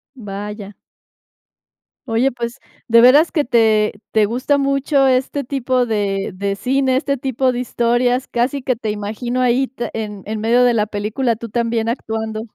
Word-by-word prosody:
Vaya. 205 Hz, -2 st, -7 dB, 1.3 s
Oye, 235 Hz, +3 st, +1 dB
pues, 240 Hz, +1 st, -5 dB, 0.3 s
de 230 Hz, 0 st, +6 dB
veras 280 Hz, +7 st, +6 dB
que 300 Hz, -5 st, 0 dB
te 220 Hz, -3 st, +3 dB, 0.2 s
te 215 Hz, -1 st, +3 dB
gusta 255 Hz, +6 st, 0 dB
mucho 275 Hz, 0 st, +2 dB
este 260 Hz, +1 st, 0 dB
tipo 255 Hz, -2 st, 0 dB
de 200 Hz, -3 st, -1 dB
de 200 Hz, +1 st, -3 dB
cine, 260 Hz, +1 st, +1 dB
este 280 Hz, 0 st, 0 dB
tipo 260 Hz, -1 st, 0 dB
de 245 Hz, -, -3 dB
historias, 245 Hz, +1 st, 0 dB
casi 250 Hz, +3 st, -1 dB
que 255 Hz, -1 st, 0 dB
te 220 Hz, -2 st, -3 dB
imagino 215 Hz, +4 st, -4 dB
ahí 255 Hz, +1 st, +2 dB
te 240 Hz, -2 st, -5 dB
en 210 Hz, -3 st, -5 dB
en 215 Hz, 0 st, -4 dB
medio 235 Hz, +3 st, +3 dB
de 245 Hz, -, +3 dB
la 210 Hz, -2 st, +1 dB
película 215 Hz, +3 st, -2 dB
tú 230 Hz, -, -7 dB
también 230 Hz, 0 st, -1 dB
actuando. 220 Hz, -2 st, -3 dB
235 Hz, 165 wpm, -19 LUFS, 215-260 Hz, 1.3 s, de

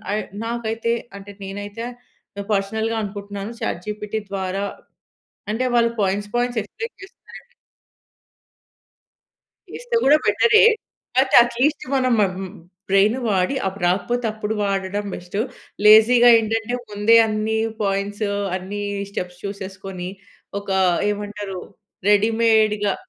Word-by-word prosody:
I -, -, 0 dB, 0.3 s
నాకైతే 230 Hz, 0 st, -2 dB, 0.2 s
అంటే, 200 Hz, +1 st, -10 dB
నేనైతే 205 Hz, +3 st, -6 dB, 0.5 s
ఆహ్, 200 Hz, -, -6 dB
పర్సనల్‌గా 220 Hz, +3 st, -1 dB
అనుకుంటున్నాను. 200 Hz, +1 st, -6 dB
చాట్‌‌‌‌‌‌‌‌‌‌‌‌‌‌‌ 175 Hz, -, -3 dB
జీపీటీ 210 Hz, +1 st, -3 dB
ద్వారా 195 Hz, 0 st, -2 dB, 0.9 s
అంటే, 235 Hz, +4 st, -1 dB
వాళ్ళు 235 Hz, -1 st, +3 dB
పాయింట్స్, 200 Hz, +1 st, -1 dB
పాయింట్స్ 245 Hz, -1 st, 0 dB
ఎక్స్‌ప్లేన్ 455 Hz, -, -8 dB
చేస్తారండి. 480 Hz, +4 st, -15 dB, 2.2 s
చేస్తే 485 Hz, -1 st, -3 dB
కూడా 290 Hz, +2 st, +7 dB
బెటరే, 445 Hz, -2 st, +5 dB, 0.6 s
అయితే 265 Hz, 0 st, 0 dB
అట్లీస్ట్ 250 Hz, +5 st, 0 dB
మనం 255 Hz, -1 st, +2 dB
మ్మ్ 190 Hz, -1 st, -1 dB, 0.4 s
బ్రెయిన్ 200 Hz, +4 st, +4 dB
వాడి 195 Hz, +5 st, +1 dB
అప్పుడు 190 Hz, -1 st, -3 dB
రాకపోతే, 240 Hz, +7 st, 0 dB
అప్పుడు 215 Hz, 0 st, -3 dB
వాడడం 200 Hz, 0 st, -1 dB
బెస్టు. 180 Hz, +3 st, -5 dB, 0.5 s
లేజీ‌గా 235 Hz, +3 st, +8 dB
ఏంటంటే, 225 Hz, +2 st, -1 dB, 0.2 s
ముందే 210 Hz, +2 st, +4 dB
అన్ని 215 Hz, +1 st, -1 dB, 0.2 s
పాయింట్స్, 200 Hz, +1 st, -1 dB, 0.3 s
అన్ని 195 Hz, +3 st, -5 dB, 0.3 s
స్టెప్స్ 180 Hz, -2 st, -5 dB
చూసేసుకొని, 190 Hz, -2 st, -6 dB, 0.5 s
ఒక 200 Hz, -, -9 dB, 0.4 s
ఏమంటారు 205 Hz, -2 st, -5 dB, 0.5 s
రెడీ‌‌మేడ్‌గా 215 Hz, -1 st, +3 dB
210 Hz, 105 wpm, -21 LUFS, 195-230 Hz, 2.2 s, లేజీ‌గా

